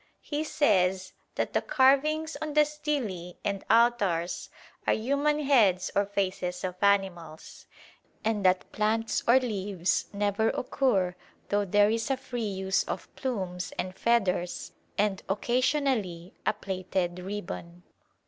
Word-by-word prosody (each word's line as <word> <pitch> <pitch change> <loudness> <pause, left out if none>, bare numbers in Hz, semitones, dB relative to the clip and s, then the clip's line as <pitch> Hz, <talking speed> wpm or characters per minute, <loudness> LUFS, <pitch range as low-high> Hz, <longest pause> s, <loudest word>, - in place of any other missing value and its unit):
He 295 +1 -2
says 190 -11 +1 0.2
that - - -2
the - - +2
carvings 305 +4 +3
on 305 -1 -4
the 300 0 +6
stelae 265 - -3
and 200 -1 -1
altars 210 -7 +2 0.4
are - - +4
human 280 +6 +1
heads 210 -10 +3
or 200 0 +2
faces 185 -2 -2
of 185 -1 -2
animals, 190 -6 -1 0.6
and 215 -2 0
that 185 0 +2
plants 220 +1 0
or 245 +3 +7
leaves 200 -7 -1
never 205 +2 +1
occur 220 -9 +1 0.4
though 205 0 +1
there 205 +2 +4
is 225 +2 -1
a 270 - +1
free 255 -2 -5
use 190 -2 0
of - - -6
plumes 185 -8 -3
and 185 0 -3
feathers 190 -6 0 0.3
and 200 -2 +1
occasionally 235 - 0
a - - +4
plaited 185 -3 -3
ribbon. 180 -2 -6
205 Hz, 130 wpm, -28 LUFS, 185-250 Hz, 0.6 s, or